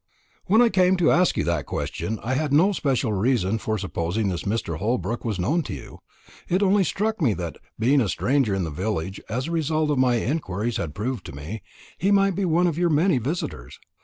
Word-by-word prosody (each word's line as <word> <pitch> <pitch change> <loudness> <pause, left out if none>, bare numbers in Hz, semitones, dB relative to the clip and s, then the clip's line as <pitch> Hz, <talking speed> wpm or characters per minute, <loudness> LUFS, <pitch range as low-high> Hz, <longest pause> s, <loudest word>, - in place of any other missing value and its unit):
"When 220 +5 +5
I 235 - +4
came 185 -2 +3
to 175 -2 +3
ask 180 +2 +3
you - - +1
that 85 -6 -1
question, 110 0 -3
I 125 - -1
had 150 +2 -1
no 170 +8 +5
special 135 - 0
reason 110 0 +1
for 110 +1 -2
supposing 95 +2 -2
this 90 -2 -4
Mr. 100 -7 -2
Holbrook 115 +1 -1
was 110 -5 -2
known 150 - +1
to - - -4
you. 65 - -11 0.5
It 185 +3 +2
only 200 0 +4
struck 215 +3 -1
me 120 -9 +3
that, 85 -2 -5 0.2
being 130 +5 +3
a 110 - 0
stranger 125 +1 +1
in 95 - -1
the 80 - -3
village, 95 +2 -3
as 125 +4 -2
the 165 - -4
result 155 -1 0
of 140 - +1
my 125 -2 +3
inquiries 115 - -2
had 80 -3 -4
proved 110 +1 -3
to 75 - -9
me, 80 +10 -6 0.4
he 195 - +1
might 195 -1 +4
be 195 +1 0
one 175 +1 +2
of 170 -2 0
your 175 -1 +3
many 155 -1 +3
visitors. 120 - -4
125 Hz, 220 wpm, -24 LUFS, -, 0.5 s, When